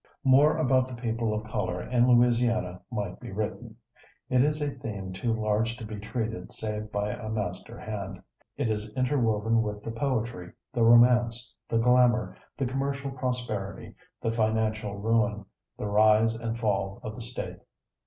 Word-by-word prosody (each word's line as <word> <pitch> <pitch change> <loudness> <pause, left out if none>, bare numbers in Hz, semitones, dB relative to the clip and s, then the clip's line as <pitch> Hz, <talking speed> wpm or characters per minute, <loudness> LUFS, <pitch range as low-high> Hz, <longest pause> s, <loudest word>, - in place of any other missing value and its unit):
More 145 +3 +5
about 130 -4 +3
the 125 -2 -8
people 115 -1 -1
of 105 0 -2
color 110 +3 -2
in 125 0 +2
Louisiana 120 -7 +3
might 105 -4 -4
be - - -8
written. 110 +3 -4 0.6
It 125 -1 +5
is 150 +1 +1
a 145 -1 -1
theme 105 -8 -6
too 115 +5 -1
large 110 +1 0
to 115 - -7
be 105 -1 -6
treated 110 -2 -4
save 105 0 -4
by 105 0 -1
a 110 0 -6
master 110 -2 -4
hand. 100 -3 -6 0.3
It - - 0
is 105 -1 -2
interwoven 115 -4 +2
with 105 -1 -4
the 115 - -4
poetry, 115 -7 -2 0.2
the 120 - 0
romance, 120 +1 +5 0.2
the 115 - +1
glamour, 125 +1 +4 0.2
the 135 - 0
commercial 135 +2 -2
prosperity, 125 -7 -4 0.3
the 115 - -1
financial 110 -2 0
ruin, 110 0 +1 0.3
the - - -4
rise 110 +2 +4
and 115 0 -4
fall 100 -3 -1
of 110 - -5
the 120 - -8
State. 120 +2 -5
115 Hz, 160 wpm, -28 LUFS, 105-125 Hz, 0.6 s, More